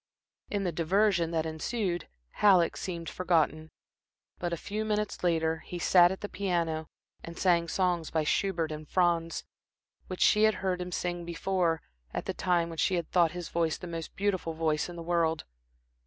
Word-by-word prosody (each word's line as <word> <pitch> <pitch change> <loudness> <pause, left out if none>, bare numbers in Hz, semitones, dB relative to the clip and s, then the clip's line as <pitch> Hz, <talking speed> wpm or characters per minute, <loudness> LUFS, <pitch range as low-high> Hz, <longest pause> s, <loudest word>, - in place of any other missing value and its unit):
In 205 -1 -1
the 180 - 0
diversion 175 +2 +2
that 165 -1 -1
ensued 175 +3 -2 0.2
Halleck 185 -5 +4
seemed 170 -3 -5
forgotten. 160 -3 +1 0.7
But 175 -1 -2
a 170 - -1
few 210 +5 -3
minutes 210 -2 -2
later, 160 -2 +1
he 175 - -7
sat 175 0 +5
at 190 - -5
the 205 - -3
piano 170 -6 -1 0.3
and 170 0 -8
sang 170 -2 +3
songs 175 -2 0
by 160 -1 0
Schubert 170 -1 0
and 155 -1 -7
Franz, 170 -2 +1 0.6
which 185 - -6
she 210 +1 +5
had 220 - +3
heard 180 -1 0
him 180 0 -5
sing 175 0 -2
before, 170 -1 0 0.3
at - - -3
the - - -2
time 175 -2 +1
when 165 -1 -7
she 185 - +2
had 170 -2 -3
thought 170 -3 +3
his 175 -2 -6
voice 165 -2 0
the - - -8
most 165 -2 -6
beautiful 190 -4 -1
voice 160 0 0
in 175 - -8
the 170 - -7
world. 165 -1 +1
175 Hz, 180 wpm, -29 LUFS, 165-185 Hz, 0.7 s, sat